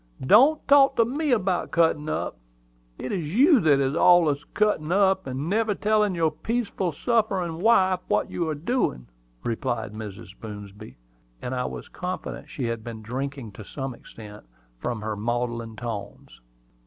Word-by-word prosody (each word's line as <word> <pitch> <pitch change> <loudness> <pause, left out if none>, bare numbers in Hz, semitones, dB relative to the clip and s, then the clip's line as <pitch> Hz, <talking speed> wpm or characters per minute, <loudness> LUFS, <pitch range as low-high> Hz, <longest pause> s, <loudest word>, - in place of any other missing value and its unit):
Don't 270 - +5
talk 275 -1 +6
to 230 - +4
me 290 +6 -2
about 190 -7 +1
cuttin' 160 -3 +2
up! - - -2 0.6
It 130 - -5
is 170 -2 -3
you 280 +3 +6
that 150 -6 +4
is 135 0 +1
allus 165 -3 +4
cuttin' 210 -7 +1
up, 190 -2 +3
and 135 +4 -4
never 215 +2 +1
tellin' 210 -2 +1
your 165 -2 +2
peaceful, 205 0 -2
sufferin' 190 - 0
wife 190 -4 +4
what - - 0
you 170 -2 -2
are 155 - -1
doin'," 155 - -1 0.4
replied 115 -2 -2
Mrs. 100 -3 -8
Boomsby; 105 - -9 0.4
and 125 - -5
I 125 0 -1
was - - -6
confident 180 -4 -6
she 145 -2 -5
had 115 -1 -3
been 115 -2 -8
drinking 130 0 -5
to 100 +2 -10
some 135 +4 -5
extent, 105 -3 -12 0.4
from 115 - -3
her 110 0 -3
maudlin 120 +1 -3
tones. 105 - -7
155 Hz, 155 wpm, -25 LUFS, -, 0.6 s, talk